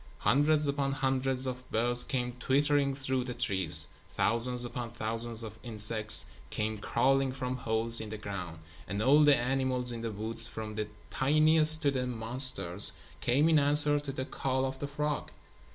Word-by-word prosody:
Hundreds 150 +2 +1
upon 140 -1 -2
hundreds 135 -1 -2
of 125 0 -7
birds 120 +2 +1
came 125 -2 -4
twittering 140 +1 0
through 130 -2 -3
the 125 -1 -7
trees; 90 -9 +5 0.2
thousands 120 +2 +2
upon 120 0 -7
thousands 115 0 -2
of 110 0 -10
insects 110 -1 +2 0.2
came 110 0 -4
crawling 135 +4 0
from 130 -1 -5
holes 115 -1 -2
in 110 - -8
the 110 - -7
ground; 90 -5 -8 0.3
and 100 +2 -5
all 140 +7 +3
the 145 -2 +4
animals 125 0 -2
in 115 -1 -7
the 115 -1 -5
woods, 115 +2 0
from 110 -2 -8
the 105 0 -5 0.2
tiniest 155 +2 +5
to 140 - +1
the 130 -2 -3
monsters, 115 -5 0 0.3
came 135 +8 +1
in 160 -2 +3
answer 145 +1 +5
to 145 -1 -7
the 130 -1 -6
call 130 -1 -3
of 130 0 -6
the 145 - -5
frog. 150 +1 -4
125 Hz, 170 wpm, -29 LUFS, 110-140 Hz, 0.3 s, trees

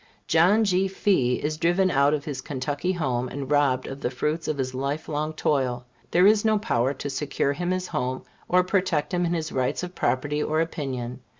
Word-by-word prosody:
John 180 +7 +4
G. 190 -2 +2
Fee 185 -10 +1
is 155 +1 -1
driven 175 +3 +2
out 140 +2 +3
of 145 - -6
his 140 -4 -4
Kentucky 145 +5 -2
home, 130 -7 -1
and 135 +1 -6
robbed 140 -3 +2
of 135 +1 -7
the - - 0
fruits 150 +6 -2
of 155 - -1
his 130 -1 -2
life 140 +4 -3
long 155 +1 -2
toil. 130 -5 0 0.2
There 180 +2 +4
is 210 +1 +5
no 220 -1 +3
power 135 - +1
to - - -5
secure 140 0 -1
him 175 +5 -3
his 185 0 -1
home, 130 +1 -2 0.3
or 180 0 +4
protect 185 -3 0
him 175 0 +1
in 170 - 0
his 160 -1 -3
rights 130 +6 -1
of 180 0 -5
property 145 +1 0
or 155 +1 0
opinion. 130 -6 -3
150 Hz, 205 wpm, -25 LUFS, 130-180 Hz, 0.3 s, is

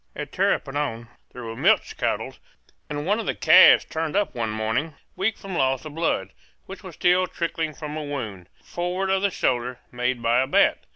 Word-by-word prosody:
At - - -6
Tapirapoan 135 -5 -1 0.2
there 125 - -9
were 115 0 -6
milch - - +2
cattle; - - -2 0.6
and 145 0 -4
one 205 +5 +1
of - - -5
the - - -1
calves - - +7
turned 160 0 -3
up 205 -1 +1
one 115 -2 -2
morning 110 +8 -2 0.2
weak 205 +3 -1
from 195 -2 -7
loss 135 -2 0
of 155 - -8
blood, 150 - -1 0.3
which 195 - -10
was 185 -5 -10
still 180 +1 +3
trickling 165 -3 -3
from 150 0 -6
a 155 - -4
wound, 110 -11 -6
forward 180 +2 -2
of 190 0 +2
the 200 - +2
shoulder, 125 -7 -1
made 125 0 -1
by 120 +2 +3
a 130 - -1
bat. - - +2
150 Hz, 190 wpm, -24 LUFS, 120-175 Hz, 0.6 s, calves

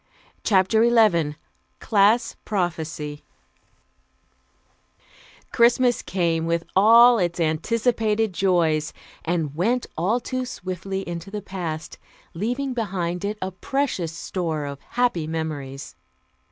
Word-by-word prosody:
CHAPTER 205 +2 +3
XI 170 -11 +3 0.4
CLASS 215 +3 +3
PROPHECY 160 -6 -3 2.3
Christmas 240 +1 +3
came, 165 -3 -1
with 170 0 0
all 230 +4 +7
its 175 -1 -1
anticipated 220 +6 0
joys, 165 -5 +1 0.3
and 160 -4 -1
went 235 +9 +1
all 195 +9 +1
too 255 +1 -3
swiftly 190 -4 -5
into 170 +1 -6
the 205 0 -6
past, 170 -5 -5 0.3
leaving 245 +9 -2
behind 180 -6 -2
it 210 +1 -2
a 190 - -3
precious 195 - -2
store 165 -3 -3
of 140 -1 -6
happy 240 -11 0
memories. 145 -4 -5
185 Hz, 100 wpm, -23 LUFS, 165-225 Hz, 2.3 s, all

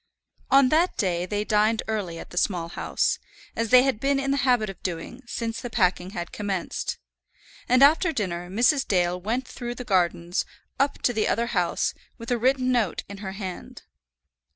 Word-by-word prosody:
On 270 -1 +6
that 330 +5 +2
day 180 -3 0
they 205 +2 -1
dined 215 +1 +2
early 200 -6 -3
at - - -10
the 175 - -10
Small 175 -4 -1
House, - - -1 0.4
as 230 -1 -1
they 250 +1 +7
had 265 -5 0
been 275 +2 +1
in 275 0 -1
the 280 - +1
habit 245 -4 +2
of 195 -3 -8
doing 180 +8 -5
since 230 -1 -3
the 245 - -5
packing 180 -5 +1
had 175 -4 -6
commenced. 195 -4 -3 0.7
And 255 +2 +6
after 320 +5 +5
dinner 180 - -3
Mrs. 250 - +2
Dale 180 -1 +1
went 240 +7 -2
through 240 -1 -6
the 250 - -6
gardens, 175 -4 +1 0.4
up 275 +1 0
to 245 - +2
the 220 -2 +1
other 230 +2 +1
house, - - 0 0.2
with 230 0 -7
a 240 - +1
written 255 +1 +2
note 235 -7 0
in 200 - -8
her 190 -2 -5
hand. 190 -3 -7
220 Hz, 185 wpm, -25 LUFS, 185-255 Hz, 0.7 s, they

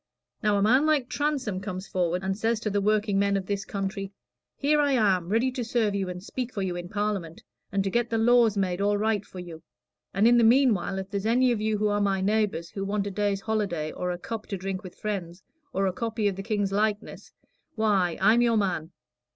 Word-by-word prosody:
Now, 210 -3 +2
a 200 - +2
man 260 +8 +4
like 290 -5 +2
Transome 275 -10 -1
comes 190 -1 -5
forward 180 0 -1
and 190 0 -1
says 225 +2 0
to 215 - -2
the 205 0 +1
workingmen 200 -1 +2
of 190 - -4
this 200 +1 -3
country: 195 -1 -4 0.5
'Here 300 +2 +2
I 285 -1 +3
am, 190 -8 +2
ready 230 +5 +2
to 255 -1 -3
serve 225 -2 0
you 195 -2 -2
and 180 0 -6
speak 250 +3 -4
for 200 - -3
you 180 -2 -2
in 175 0 -6
Parliament, 200 -5 -3 0.3
and 195 -1 +1
to 195 - -2
get 235 +2 +1
the 225 - 0
laws 230 -2 +4
made 185 -1 0
all 205 0 +2
right 215 -1 0
for 190 - -14
you; 170 -3 -8 0.5
and 200 +4 +3
in 240 0 +6
the - - +4
meanwhile, 225 -6 +3
if 190 +1 -6
there's 200 0 -2
any 250 +2 +3
of 225 -3 -1
you 215 0 0
who 210 +1 +1
are 205 0 +1
my 195 -1 +1
neighbors 200 -4 0
who 195 - -4
want 200 0 -1
a 200 - -3
day's 200 0 -1
holiday, 195 -9 -1
or 180 - -3
a 175 - -2
cup 220 +4 -6
to 200 - -3
drink 190 0 -4
with 185 - -10
friends, 185 -4 -4 0.3
or 195 +1 0
a 190 - 0
copy 225 +1 -1
of 200 - -1
the 195 - -5
King's 205 -2 -1
likeness 210 +1 -2 0.4
why, 200 -6 +1
I'm 220 +5 +5
your 235 -2 +3
man. 180 -6 -1
205 Hz, 230 wpm, -26 LUFS, 190-225 Hz, 0.5 s, in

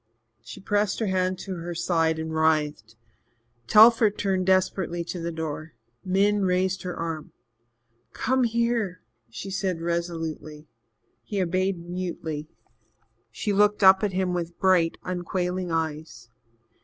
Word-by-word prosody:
She - - -10
pressed 205 0 0
her 225 - -1
hand 185 -1 0
to 190 -2 -5
her 170 +1 -6
side 165 -2 +1
and 160 0 -4
writhed. 150 -8 0 0.7
Telford 220 - +6
turned 190 -2 0
desperately 185 -2 +1
to 175 +1 -6
the 170 0 -3
door. 160 0 -5 0.3
Min 200 +2 +2
raised 185 0 +1
her 180 -1 -5
arm. 165 -2 -5 0.8
"Come 260 0 0
here," 230 -5 -1 0.3
she 120 +13 -7
said 190 -3 -2
resolutely. 165 -3 -4 0.5
He 205 - -4
obeyed 185 +1 0
mutely. 165 -4 -5 0.8
She 205 - -2
looked 210 +1 +3
up 190 +1 +7
at 205 -3 0
him 185 -1 0
with 170 -1 -4
bright, 180 -3 +3
unquailing 180 0 -3
eyes. 155 -7 -4
180 Hz, 130 wpm, -25 LUFS, 165-190 Hz, 0.8 s, up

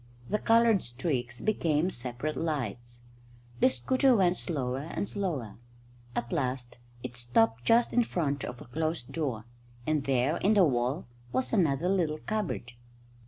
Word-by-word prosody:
The 210 - +2
coloured 230 -3 +4
streaks 120 -1 -3
became 170 -5 +1
separate 125 +4 -3
lights. 120 -6 -3 0.6
The - - +6
scooter 255 - +3
went 180 -4 +3
slower 135 -8 -1
and 200 - -2
slower. 165 - -3 0.6
At 120 - -2
last 130 -6 -2 0.3
it 125 -1 -6
stopped 120 -1 +1
just 235 +1 +4
in 245 - +4
front 145 - -1
of 125 0 -6
a - - -10
closed 155 +1 -3
door, 130 -9 -2 0.4
and 155 -2 0
there, 135 +4 +2
in 215 +3 +3
the 195 -3 +6
wall, 130 +2 0 0.3
was 260 - 0
another 165 -6 +2
little 175 -5 +1
cupboard. 195 - -3
145 Hz, 145 wpm, -29 LUFS, 120-180 Hz, 0.6 s, The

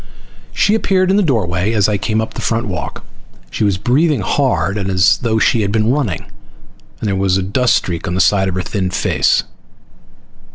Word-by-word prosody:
She 205 - +1
appeared 190 -4 +1
in 195 - +3
the - - +3
doorway 105 - 0
as 105 -2 +2
I 105 -2 -1
came 110 +2 -1
up 110 - -5
the - - -6
front 115 +1 -1
walk. 95 -4 -6 0.5
She 110 - -2
was 100 -3 +1
breathing 140 - +1
hard, 105 -3 0
as 95 -1 +2
though 115 -2 0
she 110 +1 +2
had 100 -1 -1
been 110 +2 +1
running, 125 - -2 0.7
and - - -3
there 100 - 0
was 95 -1 +1
a 95 - -1
dust 120 +6 +1
streak 85 +1 -3
on 90 - -2
the - - -1
side 95 0 +3
of 90 - -4
her 95 - -2
thin 95 -1 -2
face. - - +1
105 Hz, 200 wpm, -16 LUFS, 95-120 Hz, 0.7 s, in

